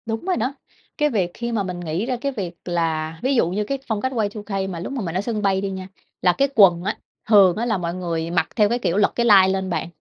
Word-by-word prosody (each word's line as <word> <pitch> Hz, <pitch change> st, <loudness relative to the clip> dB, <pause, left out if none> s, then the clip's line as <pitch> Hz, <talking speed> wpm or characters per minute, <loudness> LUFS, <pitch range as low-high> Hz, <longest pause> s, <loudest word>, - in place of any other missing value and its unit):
Đúng 225 Hz, +5 st, -4 dB
rồi 370 Hz, -1 st, 0 dB
đó. 255 Hz, +5 st, -1 dB, 0.4 s
Cái 300 Hz, -1 st, +2 dB
việc 190 Hz, -9 st, 0 dB
khi 235 Hz, 0 st, -4 dB
mà 220 Hz, -3 st, 0 dB
mình 180 Hz, -2 st, -5 dB
nghĩ 175 Hz, +4 st, -2 dB
ra 255 Hz, 0 st, -1 dB
cái 280 Hz, -, -1 dB
việc 180 Hz, -8 st, -5 dB
là 165 Hz, -2 st, -2 dB
ví 265 Hz, +2 st, +2 dB
dụ 200 Hz, -8 st, +3 dB
như 200 Hz, +4 st, -1 dB
cái 275 Hz, +6 st, -2 dB
phong 220 Hz, -3 st, -1 dB
cách 260 Hz, -, -1 dB
Y2K 205 Hz, -4 st, -2 dB
mà 175 Hz, -3 st, -5 dB
lúc 180 Hz, -, -5 dB
mà 265 Hz, -, -3 dB
mình 170 Hz, -4 st, -4 dB
ở 185 Hz, -, +1 dB
sân 215 Hz, 0 st, -3 dB
bay 195 Hz, -1 st, +1 dB
đi 200 Hz, -, -2 dB
nha, 190 Hz, -1 st, -6 dB, 0.3 s
là 180 Hz, -, +4 dB
cái 275 Hz, -, +2 dB
quần 175 Hz, -5 st, +6 dB
á, 205 Hz, +3 st, -2 dB, 0.3 s
thường 195 Hz, -5 st, +6 dB
á 225 Hz, +3 st, -2 dB
là 220 Hz, -4 st, 0 dB
mọi 170 Hz, -1 st, -3 dB
người 170 Hz, -2 st, -3 dB
mặc 175 Hz, -, +1 dB
theo 210 Hz, -3 st, +4 dB
cái 240 Hz, +2 st, 0 dB
kiểu 185 Hz, -6 st, 0 dB
lật 205 Hz, -, +3 dB
cái 235 Hz, -, +1 dB
lai 195 Hz, -4 st, +7 dB
lên 190 Hz, 0 st, -1 dB
bạn. 165 Hz, -2 st, -2 dB
195 Hz, 280 wpm, -22 LUFS, 175-230 Hz, 0.4 s, lai